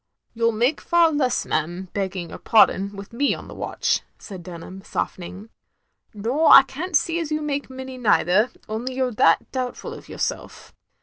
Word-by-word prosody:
"You 230 0 -1
*11 225 -2 0
make 250 +7 +1
far 340 -1 +3
less, 285 -4 0
ma'am, 175 +4 -2
begging 190 -3 -3
your - - -9
pardon, 200 -3 +3
with 200 +2 -10
me 280 +4 +1
on - - -10
the - - -10
watch," - - -1 0.2
said 190 -4 -9
Dunham, 180 +2 -9
softening. 190 +4 -5 0.7
"Nor 245 +10 +1
I - - +11
can't 320 +7 -5
see 335 +3 +2
as 325 -3 -3
you 305 - 0
make 285 -2 -3
many 260 0 -8
neither, 210 -1 +3 0.2
only 240 +4 -4
you 260 0 +1
're 250 - -3
that 165 -7 +3
doubtful 255 -2 -4
of - - -12
yourself. - - -5
235 Hz, 180 wpm, -23 LUFS, 195-270 Hz, 0.7 s, I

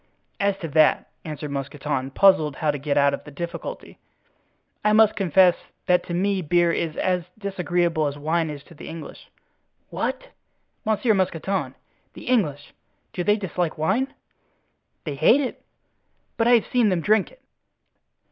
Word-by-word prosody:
"As 200 -1 +1
to 175 -4 -5
that," 155 +1 +3
answered 150 -2 -6
Mousqueton, 140 -1 -3
puzzled 155 -3 +4
how 155 -2 0
to 145 - -5
get 140 +1 -1
out 140 0 +4
of - - -4
the - - -11
difficulty, 170 +4 -7 0.8
"I 210 - +3
must 220 0 +5
confess 185 -2 +4 0.3
that 180 -2 +3
to 175 - -3
me 195 +1 +1
beer 175 +1 +2
is 165 -1 -2
as 180 -2 0
disagreeable 175 -5 0
as 145 0 -4
wine 160 +2 0
is 145 -2 -7
to 170 - -17
the 150 - -11
English." 165 -1 -10 0.6
"What! - - -3 0.6
Monsieur 220 +1 +2
Mousqueton! 185 -6 -1 0.4
The - - -10
English—do 180 - -3
they 210 +3 +3
dislike 180 -4 -2
wine?" 195 - 0 0.9
"They 150 - -4
hate 155 - +4
it." 270 -3 -4 0.7
"But 230 - +1
I 245 - +6
have 230 -3 +4
seen 240 -4 +2
them 180 -3 0
drink 210 +2 +2
it." - - -22
175 Hz, 155 wpm, -24 LUFS, 150-200 Hz, 0.9 s, I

